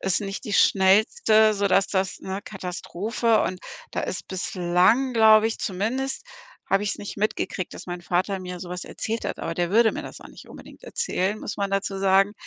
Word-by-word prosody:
ist 190 -1 +1
nicht 195 +2 -5
die 215 - -5
schnellste, 215 +3 +4
sodass 195 -1 +2
das 190 -1 -1
ne, 190 +1 -5
Katastrophe 210 +4 -1
und 185 -1 -3 0.3
da - - -2
ist 185 - -5
bislang, 185 +7 +1
glaube 220 -1 +6
ich 225 - -3
zumindest 235 - -2 0.5
habe 195 +1 +2
ich's 205 - -1
nicht 205 - -8
mitgekriegt, 200 -3 -2
dass - - -9
mein 175 0 -5
Vater 185 +3 -1
mir 180 -1 -7
so 175 0 -8
was 180 0 -5
erzählt 225 +1 -4
hat, - - -4
aber 165 - -3
der 175 +1 -1
würde 220 +2 +4
mir - - -4
das - - -10
auch - - -12
nicht - - -14
unbedingt - - -13
erzählen, 215 - -1
muss - - -6
man 200 -1 -1
dazu 195 0 -1
sagen 195 +1 +3
195 Hz, 195 wpm, -24 LUFS, 185-215 Hz, 0.5 s, glaube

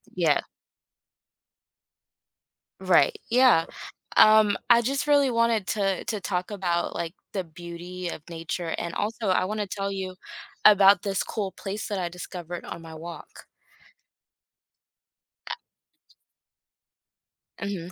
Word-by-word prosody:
Yeah. - - +3 2.4
Right. - - +4
Yeah. 240 -9 +5 0.5
Um, 215 -2 +7
I 235 0 +7
just 275 +4 -1
really 285 -3 +4
wanted 230 -4 +1
to 195 -3 0
to 215 -3 -2
talk 180 +2 -2
about, 175 -4 -1
like, 170 0 -3 0.2
the 190 - -1
beauty 175 +1 -7
of - - -7
nature. 165 0 -4
And 170 -1 -4
also, 220 0 -2
I 185 0 +2
want 215 +2 -3
to 205 - -3
tell 200 +1 -3
you 190 -1 -5 0.5
about 200 -2 +7
this 195 -2 -1
cool 200 -4 -3
place 200 +2 -5
that 205 -3 -2
I 175 -1 -2
discovered 175 -1 -7
on 170 - -7
my 160 -1 -10
walk. 170 +2 -10 2.0
A - - -2 2.1
Mhm. 185 -4 -4
195 Hz, 120 wpm, -26 LUFS, 175-215 Hz, 2.4 s, Um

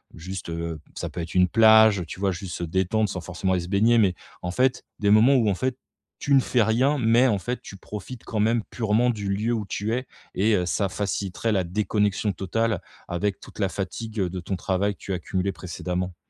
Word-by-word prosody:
juste, 90 +2 -7
heu, 85 -1 -4 0.2
ça - - -4
peut 90 - -7
être 80 - -7
une 90 -1 +4
plage 110 -3 +6
tu - - -8
vois? 100 -1 +2
Juste 90 0 -6
se - - -4
détendre 95 +5 0
sans 90 - -4
forcément 90 +2 -2
aller 90 - +1
se 85 - -7
baigner, 110 +4 +4
mais 95 -5 +3 0.3
en 90 - -3
fait, 125 +7 +1
des 100 -1 +2
moments 115 +6 +6
où 115 -5 +3
en - - +2
fait, 130 +4 -2 0.4
tu 140 - 0
ne 135 - +7
fais 125 -2 +2
rien, 130 +7 +2
mais 120 +2 +4
en 105 -5 +1
fait, 125 +7 -4
tu - - -10
profites 105 +5 -8
quand 110 - -3
même 115 +1 +2
purement 115 +1 +2
du 105 -3 -5
lieu 105 +4 0
où 110 -3 -2
tu 105 +4 -2
es, 125 +1 -2 0.3
et 110 +3 +2
heu, 90 - 0
ça 100 +3 0
faciliterait 100 +2 -2
la 95 -3 +2
déconnexion 105 +2 0
totale 105 +2 -1 0.3
avec 95 +3 -1
toute - - -13
la 100 - +2
fatigue 110 +4 -5
de 90 0 -2
ton 95 +2 -3
travail 95 +3 0
que - - -37
tu 95 - -4
as 90 - -2
cumulé 95 +3 -2
précédemment. 90 0 -4
100 Hz, 225 wpm, -25 LUFS, 90-115 Hz, 0.4 s, ne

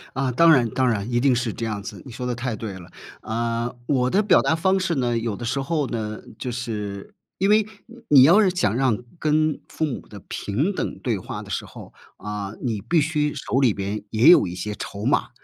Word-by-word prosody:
啊， 130 -1 0
当 165 +7 +5
然 120 -5 +3
当 130 -1 +1
然， 110 +1 -2
一 120 - +2
定 130 -1 +3
是 120 -3 -1
这 115 - -4
样 105 -2 -3
子， - - -8
你 130 - -9
说 125 - -6
得 125 - -1
太 120 -1 -3
对 110 -3 -6
了。 95 -1 -11 0.3
呃， 115 +2 -2
我 130 -3 +1
的 205 +7 +2
表 190 -3 +5
达 160 - +1
方 190 +3 +2
式 180 -3 -1
呢， 120 -3 0
有 115 -3 -2
的 120 - -6
时 135 +4 -1
候 145 -1 -1
呢， 110 -2 -4 0.2
就 125 - -3
是 105 -5 -5 0.2
因 195 +2 +1
为 215 +1 +5 0.2
你 235 +1 -15
你 140 -3 +8
要 175 +9 +7
是 195 - +4
想 115 - 0
让 125 -4 +2 0.2
跟 155 0 +1
父 160 - -2
母 135 - -5
的 105 - -11
平 140 - -1
等 - - -4
对 115 -6 -1
话 - - -6
的 - - -13
时 - - -3
候， - - -12 0.2
啊， 105 -1 -5
你 110 -5 -2
必 170 -2 +2
须 150 -1 0
手 - - -2
里 125 -6 +4
边 100 +1 -4
也 115 +8 +5
有 175 - +7
一 90 - -6
些 105 +3 -4
筹 100 +2 -6
码。 135 - +1
125 Hz, 250 characters per minute, -23 LUFS, 110-150 Hz, 0.3 s, 你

